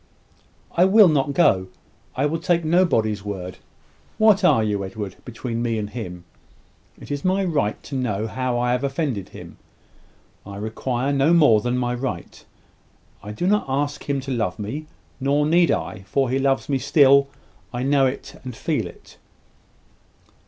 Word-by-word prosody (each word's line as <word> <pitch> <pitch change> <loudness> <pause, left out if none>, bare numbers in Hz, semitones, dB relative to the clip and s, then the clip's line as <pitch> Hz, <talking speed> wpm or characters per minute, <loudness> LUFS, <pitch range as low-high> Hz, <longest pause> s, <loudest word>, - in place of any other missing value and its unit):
"I 175 - +4
will 200 0 +7
not 145 -2 +1
go. 95 - +3 0.5
I 135 - +1
will 160 +3 -1
take 170 0 +1
nobody's 115 - +2
word. 95 -3 -6 0.6
What 215 -2 +4
are 145 -11 +4
you, 105 -2 -1
Edward, 95 -1 -6
between 120 -1 -5
me 115 -2 -1
and 105 -1 -4
him? 90 -7 -7 0.8
It - - -10
is 145 0 -3
my 190 +1 +1
right 145 - -1
to - - -11
know 110 -5 -1
how 125 +1 -2
I 120 0 +1
have 125 +2 0
offended 135 - -2
him. - - -12 0.9
I 100 0 -9
require 120 +5 -2
no 140 +4 +3
more 145 -11 +5
than 125 +2 -1
my 125 -1 -1
right. 125 -8 -5 0.8
I 105 - -8
do 105 +12 -3
not 210 +2 +2
ask 145 +2 -2
him 140 -1 +1
to 135 +1 -6
love 110 -7 -1
me; 135 +10 -5 0.3
nor 140 +2 +1
need 170 +2 +4
I, - - -2
for 135 +4 0
he 135 - +1
loves 135 0 +1
me 135 -2 0
still 140 -1 +5 0.4
I 120 0 -3
know 135 0 +3
it 130 - -7
and 125 -2 -7
feel - - -2
it." - - -15
130 Hz, 165 wpm, -22 LUFS, 110-145 Hz, 0.9 s, will